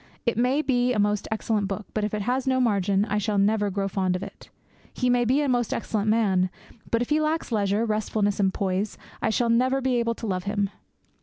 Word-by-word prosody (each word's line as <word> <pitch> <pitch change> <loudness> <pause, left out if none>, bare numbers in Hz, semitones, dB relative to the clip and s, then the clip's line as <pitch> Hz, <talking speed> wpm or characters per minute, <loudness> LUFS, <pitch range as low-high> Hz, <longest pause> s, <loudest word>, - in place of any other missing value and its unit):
It 235 - +1
may 255 +6 +2
be 250 -2 +2
a - - -1
most 205 0 +1
excellent 215 -2 -1
book; 195 +1 -4
but 215 - -1
if 210 - -1
it 210 - -2
has 255 +4 -1
no 260 0 +2
margin, 200 -4 +2
I 210 -1 -1
shall 210 0 -1
never 205 +1 +2
grow 195 0 -1
fond 185 -2 0
of 185 - -3
it. - - -11 0.4
He 250 -1 0
may 245 -1 +3
be 260 +5 +2
a 290 - 0
most 245 -3 +1
excellent 215 -2 -1
man; 195 -5 +2 0.4
but 230 +1 +1
if 245 - -9
he 305 +1 +3
lacks 310 -2 -1
leisure, 205 0 +1
restfulness, 215 -2 0
poise, 195 +2 -2 0.2
I - - +1
shall 235 +2 +1
never 255 +3 +2
be 260 -2 +1
able 230 -1 0
to 230 - -7
love 185 -3 -2
him. 205 -1 -1
215 Hz, 225 wpm, -25 LUFS, 200-245 Hz, 0.4 s, may